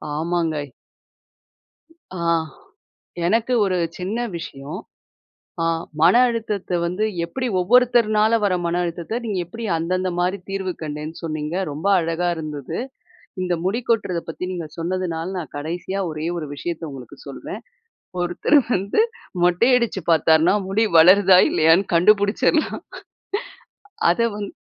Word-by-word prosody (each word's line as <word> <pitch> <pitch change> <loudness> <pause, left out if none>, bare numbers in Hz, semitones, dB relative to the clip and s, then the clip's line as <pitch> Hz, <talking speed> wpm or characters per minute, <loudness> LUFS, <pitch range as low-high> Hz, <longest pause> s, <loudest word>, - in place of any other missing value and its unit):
ஆமாங்க. 160 -3 -1 1.5
ஆ - - -3 1.1
எனக்கு 230 +5 +1
ஒரு 185 -2 0 0.2
சின்ன 195 +6 -3 0.2
விஷயம். 140 -2 -7 0.8
அ, - - +1 0.4
மன - - +6
அழுத்தத்த 210 -6 -2
வந்து 180 +5 -1 0.2
எப்படி 255 +6 -3
ஒவ்வொருத்தர்னால 220 0 +4
வர 190 - +2
மன 170 +1 0
அழுத்தத்த, 175 +7 -3
நீங்க 205 -4 -2
எப்படி 230 +7 -9
அந்தந்த 185 +3 -1
மாரி 180 +3 +1
தீர்வு 190 -1 -2
கண்டேன்னு 150 +1 -5
சொன்னீங்க. 155 +1 -3 0.2
ரொம்ப 155 +7 -3
அழகா 165 +1 -1
இருந்தது. 150 -4 -5 0.6
இந்த 180 -1 0
முடி 215 +6 0
கொட்டுறத 195 -7 +1
பத்தி 165 - -5
நீங்க 170 -3 -4
சொன்னதுனால 170 -1 -2
நான் 165 - -7
கடைசியா 175 +6 -4
ஒரே 155 0 -5
ஒரு 155 -3 -4
விஷயத்த 170 +3 -5
உங்களுக்கு 130 -3 -10
சொல்றேன். - - -7 0.6
ஒருத்தர் 175 - +3
வந்து 200 - +1 0.4
மொட்டை 180 +8 +3
அடிச்சு 235 -5 -1
பாத்தாருன்னா 160 +3 +4
முடி 215 +3 +2
வளருதா 185 +2 +7
இல்லையான்னு 165 +5 +4
கண்டுபுடிச்சுறலாம். 210 - +3 1.3
அத 175 - -2 0.2
வந் 205 -1 -4
180 Hz, 120 wpm, -22 LUFS, 165-205 Hz, 1.5 s, வளருதா